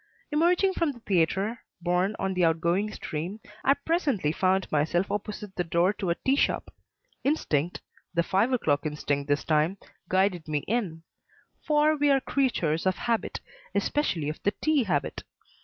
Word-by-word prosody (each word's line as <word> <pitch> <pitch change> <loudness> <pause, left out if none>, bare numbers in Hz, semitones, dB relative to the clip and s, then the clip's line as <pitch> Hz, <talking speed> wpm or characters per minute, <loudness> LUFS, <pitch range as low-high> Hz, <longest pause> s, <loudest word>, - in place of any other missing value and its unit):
Emerging 355 +5 +3
from 335 -4 +1
the 240 - -14
theatre, 195 +4 +1 0.2
borne 180 +4 +1
on 195 0 -1
the 180 -1 +1
outgoing 170 +5 +2
stream, 175 +6 -5 0.2
I 275 - +5
presently 285 - 0
found 185 +3 +1
myself 160 +5 +1
opposite 210 -1 -4
the 180 - 0
door 175 +3 +2
of 190 - 0
a 170 - +2
tea 270 - +4
shop. - - 0 0.5
Instinct 175 - 0 0.3
the 170 -1 +1
five 200 +8 +2
o'clock 150 - +1
instinct 145 -1 -2
this 145 0 +1
time 155 +4 +2 0.3
guided 185 -3 +1
me 150 -2 -1
in; 190 -8 -1 0.6
for 305 0 +4
we 290 -1 +2
are 275 -1 +5
creatures 190 - 0
of 185 - +2
habit, 235 -2 -2 0.3
especially 185 - 0
of 155 - -4
the 205 - 0
tea 305 -5 +2
habit. 150 -8 -1
190 Hz, 155 wpm, -27 LUFS, 165-255 Hz, 0.6 s, I